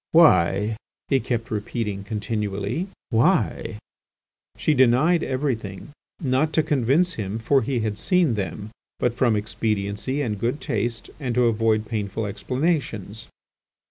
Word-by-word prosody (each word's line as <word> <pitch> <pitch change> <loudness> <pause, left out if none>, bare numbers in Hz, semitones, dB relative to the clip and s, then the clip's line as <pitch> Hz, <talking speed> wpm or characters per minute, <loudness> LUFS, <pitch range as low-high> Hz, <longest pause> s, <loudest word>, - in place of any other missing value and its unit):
why?" 105 - +5 0.3
he 135 - +4
kept 120 0 -3
repeating 105 -1 -3
continually, 105 - -2 0.2
"why?" 115 - +2 0.8
She 155 - +2
denied 135 +6 +4
everything, 130 -6 -3 0.3
not 145 +1 +1
to 160 - +3
convince 145 +7 +2
him, 105 -4 -3
for 130 +5 +2
he 125 +1 -1
had 105 -1 -2
seen 175 - +2
them, 105 +1 -4 0.3
but 120 - +1
from 120 -2 +2
expediency 105 +4 -1
and 105 -5 -2
good 120 +7 -1
taste, 115 +2 -2
and 125 -5 -2
to 125 -1 +4
avoid 110 -1 +2
painful 105 -1 -3
explanations. 120 - -2
115 Hz, 125 wpm, -24 LUFS, 105-135 Hz, 0.8 s, why